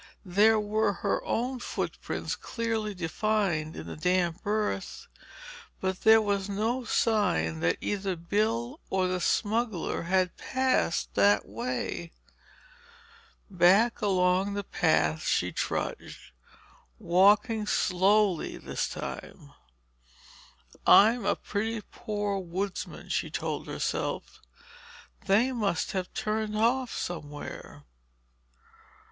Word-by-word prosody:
There 210 +4 +4
were 210 0 +1
her - - +1
own 250 +2 -1
footprints - - -4
clearly 225 -3 -3
defined 175 -2 -1
in - - -7
the - - -7
damp 180 +1 0
earth—but 215 - -5
there 220 0 +7
was 200 -1 -1
no 225 +6 -1
sign 180 - +1
that 85 +1 +1
either 195 -2 -2
Bill 225 - -1
or 190 -1 +1
the 185 0 -1
smuggler 220 -1 0
had 185 +1 +1
passed 260 -9 0
that 100 0 +3
way. 110 - -4 1.3
Back 195 +6 +4
along 190 0 +2
the 200 - -2
path 80 - +1
she - - +1
trudged, - - -4 0.7
walking 210 - +3
slowly 190 -1 +2
this - - -3
time. - - -8 1.3
"I'm 225 +1 +6
a - - +3
pretty 220 +2 -3
poor 205 -2 -3
woodsman," 185 +2 -5
she - - -1
told - - -4
herself. - - -3 0.9
"They 220 +7 +4
must 205 -9 -1
have 185 -2 -3
turned 215 0 -2
off 240 +3 +2
somewhere." 150 -4 -6
200 Hz, 100 wpm, -28 LUFS, 180-220 Hz, 1.3 s, there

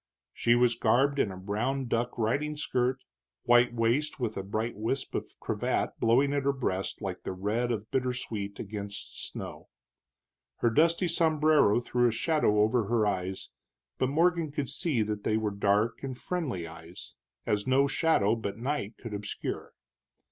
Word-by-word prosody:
She 120 0 +3
was 120 -1 +4
garbed 135 +5 +2
in 100 - +2
a 95 - -8
brown 115 +8 -2
duck 120 +1 -1
riding 140 +7 0
skirt, 130 -2 0 0.4
white 120 0 +5
waist 120 +7 0
with 115 -4 -2
a 95 - -2
bright 110 +4 -3
wisp 115 +6 -3
of - - -4
cravat - - -1
blowing 130 +5 +3
at 140 - +1
her 140 +1 +2
breast 95 -7 -3
like 95 -2 -4
the - - -4
red 105 +6 -1
of 110 -2 -4
bittersweet 120 -6 -2
against 100 -1 -6
snow. - - -8 0.9
Her 120 - +1
dusty 170 +7 +3
sombrero 155 -8 +3
threw 120 0 +1
a - - +2
shadow 115 -4 +2
over 110 +1 +2
her 110 0 +2
eyes, 95 -2 -2 0.5
but 130 - +2
Morgan 165 +2 +2
could 140 -3 -3
see 140 -10 0
that 105 -1 -4
they 110 - +1
were 110 -1 -1
dark 100 +3 +1
and 130 -2 -5
friendly 140 - -3
eyes, 80 -5 -10 0.3
as 105 +1 0
no 135 +2 +4
shadow 140 -8 +2
but 105 -3 -4
night 120 -3 -3
could 115 -4 -8
obscure. 100 0 -5
120 Hz, 160 wpm, -29 LUFS, 105-135 Hz, 0.9 s, white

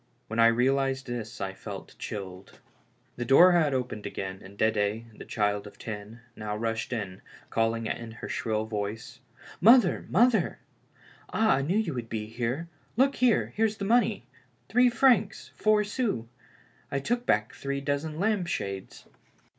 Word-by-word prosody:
When 115 +1 -2
I 115 - +8
realized 135 +3 +2
this 120 -2 -5
I 95 -2 -3
felt - - -9
chilled. 95 -2 -7 0.6
The 120 - -2
door 135 +9 +7
had 165 -4 +3
opened 125 -5 -3
again, 95 -1 -5
and 100 +1 -13
Dedd, 110 +1 +2 0.4
the - - -8
child 105 -2 0
of - - -14
ten, 110 +1 -7
now 105 -1 -4
rushed 115 +1 -2
in, 100 -6 -4 0.3
calling 115 0 0
out - - -2
in 115 -1 -8
her 120 - -8
shrill 110 -1 -1
voice: 110 0 -5 0.2
" - - -17
Mother, 240 -8 +4
mother! 240 0 +3 0.7
Ah, 220 -8 +3
I - - 0
knew 170 +9 0
you 215 -8 0
would 120 -3 -5
be 110 -1 -3
here. 120 +8 -3 0.3
Look 270 +2 +3
here, 250 -3 +2
there's 215 -1 +1
the 200 - -3
money 240 +4 +2 0.2
— - - -39
three 250 0 +5
francs, 235 -4 +2
four 215 0 +3
sous. 210 - -2 0.7
I 140 - 0
took 240 - -1
back - - +2
three 140 0 -3
dozen 145 +3 -2
lampshades." 175 - -2
125 Hz, 160 wpm, -28 LUFS, -, 0.7 s, I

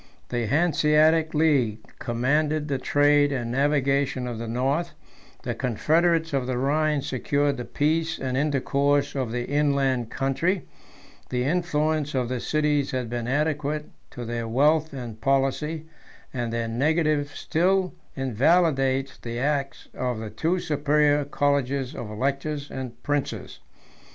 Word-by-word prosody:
The 120 -2 -1
Hanseatic 155 +2 +3
League 130 -9 +2
commanded 150 +5 0
the 140 -3 -1
trade 145 +1 +3
and 120 -4 -2
navigation 140 -1 +1
of 120 -2 -5
the 115 - -5
north: 135 +9 -1 0.5
the - - -2
confederates 160 +6 +1
of 130 -2 0
the 130 -1 -1
Rhine 150 +2 +1
secured 140 +2 0
the 120 - -5
peace 160 +2 0
and 130 -1 -3
intercourse 140 0 +1
of 130 -5 -2
the 120 0 -2
inland 140 -4 +1
country; 160 +9 0 0.7
the 125 -1 -1
influence 155 -1 0
of 125 -2 0
the 125 -1 -2
cities 150 0 +1
has 130 -1 -2
been 120 0 -4
adequate 150 +2 -1 0.2
to 120 - -7
their 115 0 -3
wealth 150 +6 +2
and 120 -5 -7
policy, 135 +5 0 0.5
and 120 -3 -2
their 115 0 -1
negative 150 +4 +1
still 185 +3 +1 0.2
invalidates 135 +1 +2
the 115 0 -5
acts 140 +1 -1
of 125 -2 -2
the 110 -1 -6
two 160 +12 0
superior 150 -2 +2
colleges 140 -2 0
of 110 - -6
electors 140 +6 -2
and 130 -2 -6
princes. 145 -1 -3
140 Hz, 135 wpm, -25 LUFS, 125-150 Hz, 0.7 s, Hanseatic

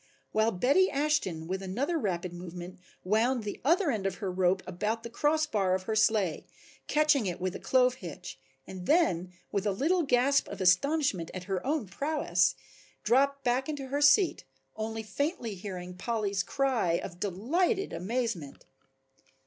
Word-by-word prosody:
While 220 +1 +2
Betty 280 - +3
Ashton 280 - 0
with 190 +3 -3
another 245 - -2
rapid 180 - -2
movement 175 +1 -8 0.2
wound 225 +5 +1
the 205 - -6
other 335 +3 +3
end 205 -5 -1
of 190 - -3
her 195 -4 -4
rope 185 0 +1
about 210 +5 -2
the 235 - -7
cross 310 +5 +2
bar 195 -9 +1
of 185 - -4
her 220 +3 -2
sleigh 215 -6 +2 0.4
catching 300 -7 +3
it 175 - -3
with 185 0 -2
a - - -5
clove 255 -1 +3
hitch 155 -6 -8 0.3
and 185 -1 -8
then, 185 - +2 0.2
with 200 0 -1
a - - +2
little 320 - +1
gasp 275 -1 +2
of - - -8
astonishment 190 - +2
at 185 - -5
her 185 0 -3
own 285 -2 0
prowess, 195 - +1 0.5
dropped 275 +3 +2
back 255 +3 0
into 280 -3 -4
her 285 +2 -1
seat, 295 +6 +4 0.3
only 220 0 -4
faintly 245 - -2
hearing 180 -2 -7
Polly's 200 0 -1
cry 245 -4 0
of 175 +1 -4
delighted 320 - 0
amazement. 200 - -3
220 Hz, 160 wpm, -29 LUFS, 185-280 Hz, 0.5 s, seat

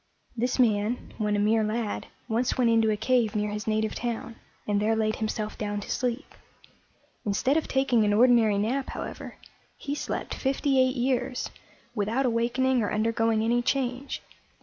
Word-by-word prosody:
This 245 +2 0
man, 220 -1 +1
when 210 -1 +1
a - - +1
mere 215 +2 +3
lad, 215 0 -2 0.2
once 235 +1 0
went 240 -2 +3
into 225 -1 +4
a 210 - +1
cave 230 -1 +1
near 210 0 0
his 210 +1 -5
native 215 0 0
town, 235 -1 -4 0.3
and 205 -1 +1
there 220 +1 +2
laid 215 -1 0
himself 215 -1 -3
down 205 -1 -2
to 205 - -6
sleep. 250 +3 -2 0.9
Instead 220 +7 +1
of 320 - 0
taking 265 -4 +2
an 205 - +2
ordinary 225 -2 +5
nap, 250 +7 -1
however, - - -6 0.4
he 285 - -4
slept 290 - -4
fifty 270 0 +1
eight 255 0 +3
years, 250 0 -1 0.4
without 225 +4 0
awakening 245 +2 +1
or 210 - -1
undergoing 225 0 +1
any 240 +2 +2
change. 255 +1 -2
230 Hz, 165 wpm, -27 LUFS, 215-255 Hz, 0.9 s, ordinary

